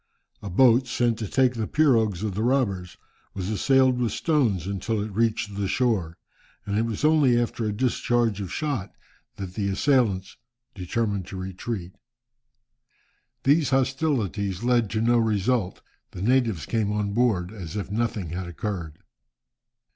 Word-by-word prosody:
A 100 Hz, -, -6 dB
boat, 125 Hz, +6 st, +4 dB
sent 120 Hz, -2 st, 0 dB
to 110 Hz, -, -3 dB
take 130 Hz, +3 st, +2 dB
the 110 Hz, -3 st, -3 dB
pirogues 115 Hz, -, +2 dB
of 105 Hz, -3 st, -2 dB
the 105 Hz, -, -2 dB
robbers, 110 Hz, -8 st, 0 dB, 0.4 s
was 95 Hz, +1 st, -3 dB
assailed 130 Hz, +3 st, +3 dB
with 120 Hz, -3 st, 0 dB
stones 120 Hz, -, +1 dB
until 100 Hz, +3 st, -2 dB
it 105 Hz, +1 st, -3 dB
reached 110 Hz, -1 st, 0 dB
the 100 Hz, -1 st, -1 dB
shore, 100 Hz, -8 st, 0 dB, 0.5 s
and 100 Hz, -, -2 dB
it 115 Hz, +2 st, +1 dB
was 115 Hz, +5 st, -2 dB
only 145 Hz, -6 st, +4 dB
after 120 Hz, -1 st, -2 dB
a 105 Hz, -, 0 dB
discharge 120 Hz, -2 st, 0 dB
of 95 Hz, -, -5 dB
shot 135 Hz, -10 st, -3 dB, 0.4 s
that 95 Hz, -2 st, -7 dB
the 100 Hz, 0 st, -1 dB
assailants 100 Hz, -4 st, +1 dB, 0.4 s
determined 100 Hz, 0 st, -2 dB
to 95 Hz, -, -7 dB
retreat. 95 Hz, 0 st, -5 dB, 1.5 s
These 145 Hz, +1 st, +3 dB
hostilities 130 Hz, -, 0 dB
led 120 Hz, -3 st, +2 dB
to 110 Hz, +1 st, -1 dB
no 120 Hz, +1 st, +3 dB
result, 110 Hz, -1 st, 0 dB, 0.3 s
the 90 Hz, -, -5 dB
natives 115 Hz, -, +1 dB
came 110 Hz, -3 st, 0 dB
on 105 Hz, -1 st, -1 dB
board 105 Hz, -6 st, +1 dB
as 95 Hz, -4 st, -8 dB
if 100 Hz, -1 st, -4 dB
nothing 110 Hz, -5 st, -2 dB
had 90 Hz, +1 st, -4 dB
occurred. 85 Hz, -3 st, -5 dB
110 Hz, 150 wpm, -25 LUFS, 95-125 Hz, 1.5 s, boat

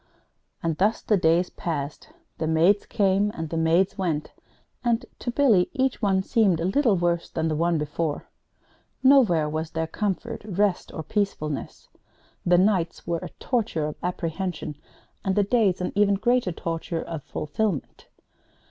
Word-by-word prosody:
And 165 Hz, -2 st, -1 dB
thus 210 Hz, +4 st, +2 dB
the 215 Hz, -, +3 dB
days 170 Hz, 0 st, +2 dB
passed. 150 Hz, -, -4 dB, 0.3 s
The 160 Hz, -, -1 dB
maids 170 Hz, +6 st, +3 dB
came 200 Hz, -2 st, +2 dB
and 160 Hz, -2 st, -5 dB
the -, -, -2 dB
maids 170 Hz, +5 st, +2 dB
went, 160 Hz, -5 st, -1 dB, 0.5 s
and, 240 Hz, 0 st, +1 dB
to -, -, -4 dB
Billy, 235 Hz, -8 st, +3 dB
each 265 Hz, -2 st, 0 dB
one 190 Hz, -3 st, +2 dB
seemed 195 Hz, -6 st, +2 dB
a 165 Hz, -, -1 dB
little 220 Hz, +3 st, +3 dB
worse 170 Hz, -1 st, 0 dB
than 160 Hz, 0 st, -1 dB
the 155 Hz, -, 0 dB
one 170 Hz, +2 st, +1 dB
before. 150 Hz, +1 st, -3 dB, 0.8 s
Nowhere 230 Hz, -, +5 dB
was 155 Hz, +1 st, -3 dB
there 160 Hz, 0 st, -2 dB
comfort, 210 Hz, +6 st, -3 dB
rest, 200 Hz, -2 st, 0 dB
or 160 Hz, -, -5 dB
peacefulness. 155 Hz, -7 st, -3 dB, 0.6 s
The 175 Hz, 0 st, +4 dB
nights 185 Hz, -3 st, +1 dB
were 170 Hz, 0 st, -1 dB
a -, -, -7 dB
torture 220 Hz, -, -1 dB
of 150 Hz, -, -4 dB
apprehension, 175 Hz, -2 st, -3 dB, 0.5 s
and 190 Hz, -1 st, 0 dB
the 205 Hz, -, +4 dB
days 205 Hz, -4 st, +2 dB
an 180 Hz, -, -1 dB
even 205 Hz, -1 st, +3 dB
greater 240 Hz, -1 st, +1 dB
torture 165 Hz, 0 st, -3 dB
of 165 Hz, -3 st, -6 dB
fulfilment. 155 Hz, +4 st, -3 dB
180 Hz, 155 wpm, -25 LUFS, 160-210 Hz, 0.8 s, Nowhere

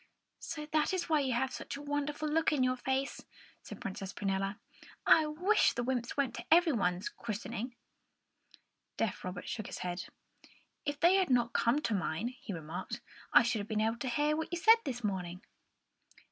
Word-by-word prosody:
"So 300 Hz, -2 st, -5 dB
that 310 Hz, +4 st, +1 dB
is 355 Hz, -2 st, -2 dB
why 310 Hz, -2 st, +4 dB
you 265 Hz, -3 st, 0 dB
have 260 Hz, +2 st, 0 dB
such -, -, -5 dB
a -, -, -8 dB
wonderful 290 Hz, +1 st, -2 dB
look 320 Hz, +2 st, +2 dB
on 285 Hz, -4 st, +2 dB
your 255 Hz, 0 st, +2 dB
face," 265 Hz, +2 st, -2 dB, 0.4 s
said -, -, -9 dB
Princess 195 Hz, 0 st, -5 dB
Prunella. 195 Hz, 0 st, -1 dB, 0.5 s
"I 315 Hz, -1 st, +6 dB
wish 360 Hz, +8 st, +3 dB
the 240 Hz, -, -2 dB
wymps 245 Hz, 0 st, -2 dB
went 270 Hz, -4 st, +1 dB
to 235 Hz, -, -6 dB
everybody's 235 Hz, -, +4 dB
christening!" 235 Hz, +2 st, -5 dB, 1.2 s
Deaf 220 Hz, -4 st, -1 dB
Robert 180 Hz, 0 st, -5 dB
shook 215 Hz, -, -4 dB
his -, -, -6 dB
head. 180 Hz, 0 st, -3 dB, 0.8 s
"If 290 Hz, 0 st, -1 dB
they 350 Hz, +3 st, +6 dB
had 375 Hz, -2 st, +2 dB
not 240 Hz, -2 st, +2 dB
come 240 Hz, +6 st, +2 dB
to 225 Hz, -, 0 dB
mine," 195 Hz, +3 st, -1 dB
he 250 Hz, -4 st, -9 dB
remarked, 165 Hz, -1 st, -5 dB, 0.3 s
"I -, -, +8 dB
should 230 Hz, -1 st, 0 dB
have 205 Hz, -, -5 dB
been 220 Hz, -1 st, -1 dB
able 225 Hz, +2 st, +1 dB
to 255 Hz, -, -2 dB
hear 295 Hz, +5 st, +2 dB
what 320 Hz, +2 st, -3 dB
you 345 Hz, -, -1 dB
said 440 Hz, +7 st, +6 dB
to -, -, +2 dB
me 460 Hz, -, -24 dB
this 245 Hz, -1 st, -7 dB
morning." 180 Hz, -3 st, -3 dB
250 Hz, 190 wpm, -33 LUFS, 210-300 Hz, 1.2 s, I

